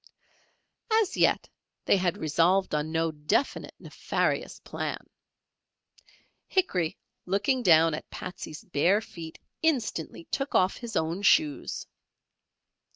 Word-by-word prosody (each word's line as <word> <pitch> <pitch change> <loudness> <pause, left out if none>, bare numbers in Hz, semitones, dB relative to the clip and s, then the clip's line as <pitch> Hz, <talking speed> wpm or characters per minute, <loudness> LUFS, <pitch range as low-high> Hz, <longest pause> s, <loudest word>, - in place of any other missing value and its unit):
As 425 -5 0
yet - - +3 0.4
they - - +4
had 180 0 0
resolved 170 +4 +2
on 150 +1 -1
no 165 0 +1
definite 150 - -1
nefarious - - -2
plan. - - -5 1.4
Hickory 185 - 0 0.3
looking 205 +8 +1
down 165 -5 +5
at 155 - -6
Patsey's 180 -4 -7
bare 180 +5 +2
feet 165 -6 -9 0.2
instantly 240 - -1
took 275 0 -2
off 185 +1 +3
his 235 -2 -7
own 165 +4 0
shoes. 300 +7 +2
180 Hz, 105 wpm, -28 LUFS, 160-225 Hz, 1.4 s, down